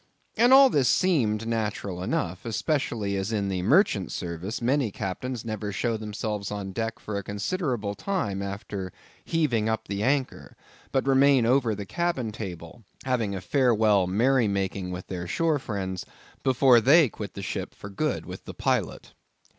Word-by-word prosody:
And 240 +3 +4
all 270 -1 +8
this 135 -4 +3
seemed 115 - +2
natural 105 -5 -2
enough; 90 -1 -2
especially 115 -4 -1
as 95 +3 -2
in 100 -3 -1
the 95 -2 -1
merchant 105 - +3
service 85 +5 -4
many 130 0 +1
captains 115 +6 -4
never 110 -2 -3
show 115 +3 -1
themselves 105 -1 -4
on 100 -2 -5
deck 115 +2 -3
for 105 -1 -4
a - - -7
considerable 105 - -2
time 105 - -2
after 100 -1 -5 0.3
heaving 125 -10 +1
up 110 0 -2
the 100 0 -3
anchor, 130 +3 -1 0.3
but 135 - +1
remain 135 -2 +5
over 120 -2 +2
the 100 0 -6
cabin 135 - -1
table, 90 -1 -8 0.2
having 115 -6 0
a 95 - -5
farewell 110 -3 +3
merry 120 +5 +3
making 95 -2 -2
with 90 0 -6
their 90 -2 -5
shore 160 - +1
friends, 95 -7 -4 0.4
before 130 -2 +5
they 145 +6 +6
quit 105 -3 -8
the 100 - -6
ship - - -4
for 100 - -9
good 95 - -2
with - - -9
the - - -8
pilot. - - -1
110 Hz, 160 wpm, -26 LUFS, 100-130 Hz, 0.4 s, all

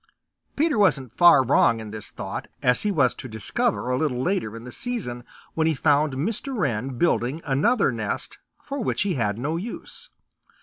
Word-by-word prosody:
Peter 295 -5 +1
wasn't 135 - +2
far 175 -6 +7
wrong 115 -2 +4
in 110 -1 -8
this 105 -1 -6
thought, - - -6 0.2
as 125 0 +3
he 210 - 0
was 140 -9 +3
to - - -9
discover 125 - -1
a 125 - +1
little 145 -6 0
later 130 - -1
in 115 - -10
the 125 - -9
season 150 - -4 0.3
when 160 0 +1
he 160 - +2
found 145 +2 +2
Mr. 225 - -2
Wren 125 - -1
building 145 -3 +1
another 155 - +2
nest 110 -3 -4 0.2
for 280 0 -5
which - - 0
he 200 -2 0
had 105 -7 -1
no 150 +7 -2
use. 215 +7 -7
140 Hz, 180 wpm, -24 LUFS, 120-195 Hz, 0.3 s, far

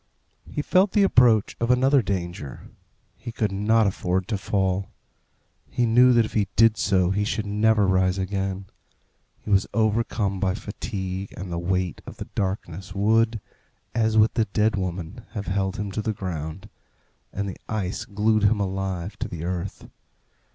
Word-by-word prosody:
He 150 - -3
felt 185 +4 +3
the 205 - +4
approach 120 - +4
of 115 - 0
another 130 +2 +4
danger. 85 - -5 0.5
He 120 - -7
could 110 -3 -1
not 110 +3 +3
afford 95 -1 -1
to 105 - 0
fall. 95 -1 0 0.8
He 120 - +1
knew 125 +3 +6
that 115 -2 +4
if - - -8
he 105 -3 +1
did 115 0 +5
so 95 -4 +2
he 105 +2 0
should 110 +1 -2
never 105 +1 +3
rise 95 0 +2
again. 95 0 -2 0.8
He 105 - -5
was 100 -1 +3
overcome 110 -3 +1
by 95 -1 +1
fatigue, 100 -3 -5
and 95 -1 -6
the 85 - -2
weight 90 0 -1
of - - -9
the - - -6
darkness 95 -2 -4
would, 110 +3 +2 0.5
as 110 -1 +1
with 110 +1 +5
the 115 - +2
dead 105 0 +1
woman, 95 +3 -4
have 100 -2 -4
held 95 0 -1
him 105 -1 -3
to 110 - -2
the 110 0 -1
ground, 90 -1 -5 0.6
and 100 +1 -3
the 95 - -6
ice 100 -4 -2
glued 105 +1 +1
him 105 +1 +3
alive 95 0 -3
to - - -2
the 85 -2 -6
earth. 90 +2 -4
100 Hz, 165 wpm, -24 LUFS, 95-110 Hz, 0.8 s, knew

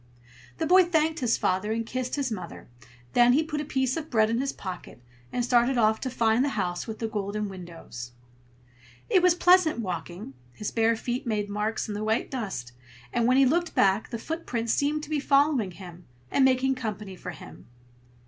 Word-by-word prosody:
The - - -1
boy 370 +3 +6
thanked 320 -1 +1
his 245 -4 +1
father 190 +4 0
and 230 +1 -1
kissed 255 +2 -3
his 275 -4 -2
mother; 180 -5 -7 0.5
then 245 0 +6
he 305 +5 +3
put 300 -1 -3
a - - -3
piece 265 -3 0
of 320 -1 -5
bread 220 -2 +3
in 230 - 0
his 275 - -1
pocket, 180 -8 -8 0.3
and 245 - -1
started 245 +1 +3
off 220 -1 +3
to 260 - -3
find 230 0 +2
the 285 - +1
house 180 -1 -2
with 220 -1 -5
the 225 - -2
golden 210 0 -3
windows. 170 -10 -9 1.0
It 370 - +5
was 360 -1 +4
pleasant 355 -4 +4
walking. 180 -5 -5 0.2
His 210 +11 -5
bare 225 0 +2
feet 245 +3 -4
made 210 -2 -1
marks 210 +2 -2
in 210 - -4
the 205 +1 -4
white 220 +2 0
dust, 195 - -4 0.4
and 235 -1 +2
when 255 +1 +4
he 275 - +6
looked 335 +5 +1
back, 195 +2 +3
the 235 - -4
footprints 235 -5 -3
seemed 295 +1 0
to 300 - -8
be 300 - +1
following 275 -6 +3
him, 180 -1 -12 0.2
and 275 - +3
making 265 0 +3
company 210 -6 -5
for 180 - -8
him. 175 - -11
230 Hz, 195 wpm, -27 LUFS, 205-275 Hz, 1.0 s, boy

